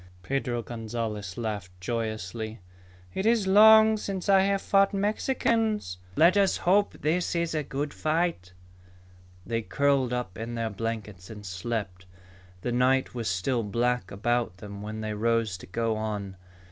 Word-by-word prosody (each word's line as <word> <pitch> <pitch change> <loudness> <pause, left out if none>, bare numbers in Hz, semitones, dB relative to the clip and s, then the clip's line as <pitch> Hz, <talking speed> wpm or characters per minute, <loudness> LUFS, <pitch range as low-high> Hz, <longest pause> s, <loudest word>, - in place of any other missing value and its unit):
Pedro 125 0 -2
Gonzalez 110 -4 -5
laughed 100 -6 -5
joyously. 110 +1 -4 0.5
"It 190 - -1
is 230 -3 +3
long 220 +2 +7
since 195 -2 -4
I 195 -1 +7
have 195 +1 +1
fought 195 0 +3
Mexicans. 215 - 0 0.2
Let 170 +4 +5
us 200 -1 +3
hope 200 +3 +2
this 170 +4 +1
is 170 -1 0
a 155 - 0
good 140 +1 -4
fight." 155 - -1 0.9
They 115 -1 -1
curled 140 +1 +1
up 125 -6 -3
in 115 +1 -4
their 115 -1 -2
blankets 105 -3 -5
and 105 -2 -9
slept. 95 -1 -4 0.5
The 120 - -2
night 130 +2 +2
was 115 -5 -2
still 95 +7 0
black 120 +1 0
about 115 -1 -1
them 100 0 -9
when 110 +1 -5
they 110 0 -3
rose 115 -1 +1
to - - -11
go 115 +3 -1
on. 105 -3 -4
115 Hz, 145 wpm, -27 LUFS, 105-170 Hz, 0.9 s, long